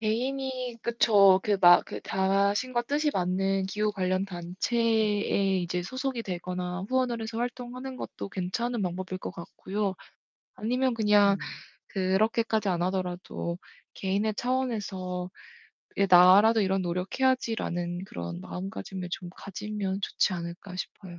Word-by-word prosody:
개인이 255 +2 -2
그쵸. 205 -5 +5
그 210 - 0
마 175 -1 +8
그 - - -7
자신과 200 +6 +1
뜻이 295 +4 0
맞는 190 +1 0
기후 210 +2 -1
관련 185 -1 0
단체에 200 +2 +1
이제 175 0 -2
소속이 255 +4 -3
되거나 180 -1 -4
후원을 255 -2 +1
해서 225 +1 -4
활동하는 250 +2 -5
것도 - - -6
괜찮은 225 +6 -2
방법일 185 +1 -3
것 - - -5
같고요 195 +3 -4 0.6
아니면 250 +3 0
그냥 210 -3 +4 0.5
그렇게까지 215 +3 +1
안 175 -1 0
하더라도 180 -2 -3 0.4
"'개인의 200 +3 0
차원에서 205 -8 -2 0.7
이게 200 - +3
나라도 190 +5 +7
이런 190 -1 +1
노력해야지'라는 180 -2 -1
그런 85 - -6
마음가짐을 190 - -6
좀 180 -2 -5
가지면 200 +1 -4
좋지 195 - +1
않을까?" 170 +2 -7
싶어요. 180 -1 -7
195 Hz, 300 characters per minute, -28 LUFS, 185-230 Hz, 0.7 s, 마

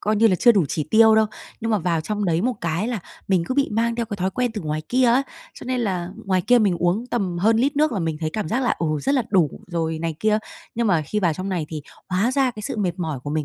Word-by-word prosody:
coi 215 +1 0
như 225 +2 +5
là 185 -5 +3
chưa 240 - +6
đủ 195 -6 +3
chỉ 155 +1 -3
tiêu 220 0 +6
đâu. 220 0 +4 0.3
Nhưng 225 - -2
mà 215 - +2
vào 170 -2 0
trong 210 +5 -3
đấy 170 -1 +1
một 250 +2 0
cái 170 +6 -1
là 235 -5 -2 0.3
mình 185 -3 +2
cứ 255 - -2
bị 280 0 +2
mang 230 +2 +1
theo 230 -1 -2
cái 205 - -5
thói 190 0 -1
quen 245 +5 -1
từ 210 - -3
ngoài 155 -2 -3
kia 255 +1 +2
ấy. 240 +3 +4 0.3
Cho - - -11
nên 255 0 -1
là 185 -6 -2
ngoài 185 -2 +1
kia 245 +6 +4
mình 200 -6 +2
uống 180 +8 0
tầm 195 -8 -2
hơn 220 +5 +3
lít 275 +5 +1
nước 305 +1 +3
là 210 - -1
mình 165 -3 -2
thấy 155 -1 -1
cảm 210 -2 -3
giác 240 +9 0
là, 245 - +1
ừ, 165 - -1 0.2
rất 275 - +1
là 260 - +2
đủ 175 -8 +3 0.2
rồi 165 -2 -2
này 165 0 -3
kia. 215 0 +3 0.4
Nhưng 235 0 0
mà 175 -5 +2
khi 210 +8 -2
vào 175 -4 +2
trong 185 +4 -5
này 175 -5 -2
thì 155 -2 -6 0.3
hóa 195 +6 +1
ra 270 -1 +2
cái 215 -3 -9
sự - - -4
mệt 185 -4 -1
mỏi 160 -6 -3
của 145 - -6
mình 155 0 -1
200 Hz, 300 wpm, -22 LUFS, 170-230 Hz, 0.4 s, chưa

